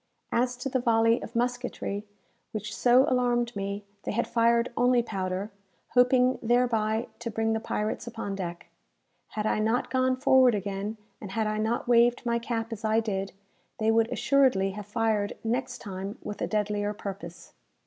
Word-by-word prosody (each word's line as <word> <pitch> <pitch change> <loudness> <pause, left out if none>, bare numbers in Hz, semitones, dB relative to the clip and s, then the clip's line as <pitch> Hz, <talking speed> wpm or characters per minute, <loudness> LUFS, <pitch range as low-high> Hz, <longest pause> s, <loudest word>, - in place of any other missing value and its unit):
As 245 +1 +1
to 250 - -4
the 260 -1 0
volley 230 -1 +3
of 235 - -9
musketry 245 -4 -2 0.5
which 210 -1 -4
so 255 +3 +5
alarmed 245 -2 +1
me, 200 +1 -4 0.2
they - - -4
had 235 +3 0
fired 235 0 +2
only 245 0 +3
powder; 190 -1 -3 0.4
hoping 250 0 +4
thereby 230 -1 +1
to 235 0 -4
bring 225 0 0
the 220 - 0
pirates 215 0 -3
upon 225 -4 -4
deck. 175 -3 -5 0.7
Had 210 - -1
I 215 - +1
not 225 +3 0
gone 260 0 +2
forward 260 -3 +5
again, 200 +2 -3 0.2
and 195 -2 -7
had 220 0 0
I 215 0 -1
not 225 +3 -1
waved 240 +1 +4
my 235 0 +1
cap 230 -1 -3
as 225 0 -8
I 220 +1 +3
did, 195 -3 -3 0.4
they 220 0 +2
would 225 0 +2
assuredly 260 -9 +3
have 205 +1 -8
fired 215 -2 0
next 245 +2 -2
time 195 +2 -6
with 210 - -6
a - - 0
deadlier 210 -1 -1
purpose. 190 -4 -8
225 Hz, 170 wpm, -28 LUFS, 210-245 Hz, 0.7 s, so